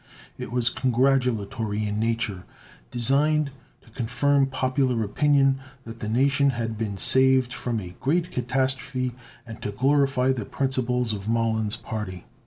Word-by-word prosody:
It -, -, -7 dB
was 120 Hz, -1 st, +1 dB
congratulatory 120 Hz, -5 st, 0 dB
in 105 Hz, 0 st, -2 dB
nature, 110 Hz, -4 st, -1 dB, 0.5 s
designed 140 Hz, +4 st, +1 dB, 0.3 s
to 115 Hz, -, -20 dB
confirm 135 Hz, +4 st, +1 dB
popular 130 Hz, -2 st, 0 dB
opinion 135 Hz, +4 st, +2 dB, 0.2 s
that 115 Hz, -1 st, -10 dB
the 105 Hz, -, -4 dB
nation 140 Hz, +4 st, +3 dB
had 115 Hz, -3 st, -3 dB
been 105 Hz, -3 st, -4 dB
saved 130 Hz, +3 st, +5 dB
from 120 Hz, -2 st, -2 dB
a 90 Hz, -3 st, -9 dB
great 170 Hz, +5 st, 0 dB
catastrophe 130 Hz, +1 st, -1 dB, 0.3 s
and 115 Hz, -1 st, -10 dB
to 105 Hz, -, -3 dB
glorify 135 Hz, +2 st, +2 dB
the 120 Hz, -6 st, -3 dB
principles 125 Hz, -3 st, -1 dB
of 100 Hz, +1 st, -5 dB
Mollon's 110 Hz, -1 st, 0 dB
party. 105 Hz, -5 st, -6 dB
125 Hz, 135 wpm, -25 LUFS, 110-135 Hz, 0.5 s, saved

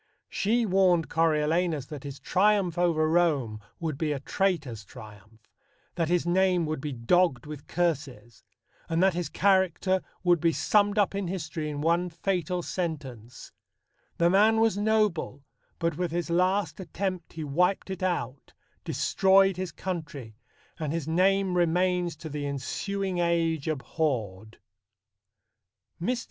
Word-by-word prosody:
She 230 Hz, +4 st, +1 dB
warned 185 Hz, -4 st, +3 dB
Coriolanus 160 Hz, -1 st, +1 dB
that 145 Hz, -1 st, -9 dB
his 140 Hz, -1 st, -7 dB
triumph 195 Hz, -3 st, +2 dB
over 170 Hz, -3 st, +2 dB
Rome 150 Hz, -10 st, +1 dB, 0.2 s
would 155 Hz, -4 st, -3 dB
be 155 Hz, -2 st, 0 dB
a 140 Hz, -, -4 dB
traitor's 145 Hz, -, -1 dB
triumph, 110 Hz, -1 st, -14 dB, 0.5 s
that 165 Hz, -2 st, -1 dB
his 175 Hz, -1 st, +1 dB
name 180 Hz, -1 st, +2 dB
would 155 Hz, -2 st, -3 dB
be 150 Hz, -, -4 dB
"dogg'd 135 Hz, +2 st, +1 dB
with 150 Hz, -1 st, -9 dB
curses," 145 Hz, -9 st, -3 dB, 0.5 s
and 165 Hz, +2 st, +1 dB
that 190 Hz, -1 st, +4 dB
his 175 Hz, 0 st, -3 dB
character 190 Hz, -1 st, +2 dB, 0.2 s
would 175 Hz, -2 st, +4 dB
be 165 Hz, 0 st, +2 dB
summed 205 Hz, +3 st, +2 dB
up 205 Hz, -2 st, +2 dB
in 200 Hz, -2 st, -2 dB
history 160 Hz, -4 st, -4 dB
in 145 Hz, -1 st, -4 dB
one 170 Hz, +3 st, +1 dB
fatal 180 Hz, 0 st, -2 dB
sentence: 135 Hz, -, -5 dB, 0.7 s
The 170 Hz, +1 st, +3 dB
man 215 Hz, +3 st, +4 dB
was 225 Hz, -3 st, +3 dB
noble, 205 Hz, -9 st, 0 dB, 0.3 s
But 170 Hz, -2 st, -1 dB
with 180 Hz, -1 st, -1 dB
his 170 Hz, +1 st, -3 dB
last 185 Hz, +4 st, +1 dB
attempt 185 Hz, -1 st, -4 dB
he 160 Hz, -, -5 dB
wiped 180 Hz, +7 st, 0 dB
it 190 Hz, -, -5 dB
out, 175 Hz, -7 st, -3 dB, 0.3 s
Destroyed 195 Hz, 0 st, +3 dB
his 185 Hz, -1 st, -4 dB
country, 155 Hz, -, -6 dB, 0.4 s
and 155 Hz, -3 st, -2 dB
his 165 Hz, -2 st, -3 dB
name 190 Hz, +3 st, +2 dB
remains 175 Hz, 0 st, +1 dB
To 160 Hz, +1 st, -9 dB
the 145 Hz, -1 st, -4 dB
ensuing 185 Hz, +7 st, -3 dB
age 165 Hz, -3 st, 0 dB
abhorr'd. 120 Hz, -, -3 dB, 1.4 s
Mr. 240 Hz, +7 st, 0 dB
170 Hz, 140 wpm, -27 LUFS, 150-185 Hz, 1.4 s, that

